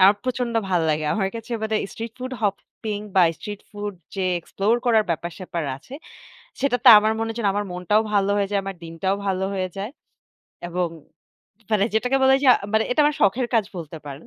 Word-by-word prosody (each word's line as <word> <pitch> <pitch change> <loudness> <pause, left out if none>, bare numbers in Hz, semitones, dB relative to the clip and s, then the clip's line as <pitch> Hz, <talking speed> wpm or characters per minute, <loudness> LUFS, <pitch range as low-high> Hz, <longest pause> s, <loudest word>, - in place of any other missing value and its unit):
আমার 195 +2 +7
প্রচণ্ড 250 -2 -2
ভাল্লাগে। 160 -4 +1
আমার 195 -3 0
কাছে 230 +1 -7
মানে 220 0 0 0.2
স্ট্রিট 230 0 -6
ফুড 255 +1 -5
হপিং 205 +1 -3 0.2
বা 185 - +7 0.2
স্ট্রিট 205 -1 -7
ফুড 205 -1 -5 0.2
যে 195 - -2 0.2
এক্সপ্লোর 200 +6 0
করার 220 -3 +4
ব্যাপার-স্যাপার 170 +1 -4
আছে, 160 - -13 0.7
সেটাতে 260 -2 +3
আমার 215 +1 +2
মনে 225 0 -1
হয় 225 - -6
যেন 215 - 0
আমার 205 0 0
মনটাও 180 +4 +2
ভালো 200 -1 +2
হয়ে 200 -1 +1
যায়, 200 -1 +1
আমার 195 -1 -5
দিনটাও 165 +4 -1
ভালো 190 -1 0
হয়ে 185 -1 -1
যায় 200 +3 -4 0.8
এবং 175 0 -1 0.8
মানে 210 -2 +3
যেটাকে 250 +4 +2
বলে 265 0 +6
যে - - +2 0.3
মানে 220 0 +3
এটা 250 - +2
আমার 295 0 +3
শখের 240 +4 +3
কাজ 225 -2 +4
বলতে 160 -2 -7
পারেন। 140 +1 -9
205 Hz, 185 wpm, -23 LUFS, 185-225 Hz, 0.8 s, আমার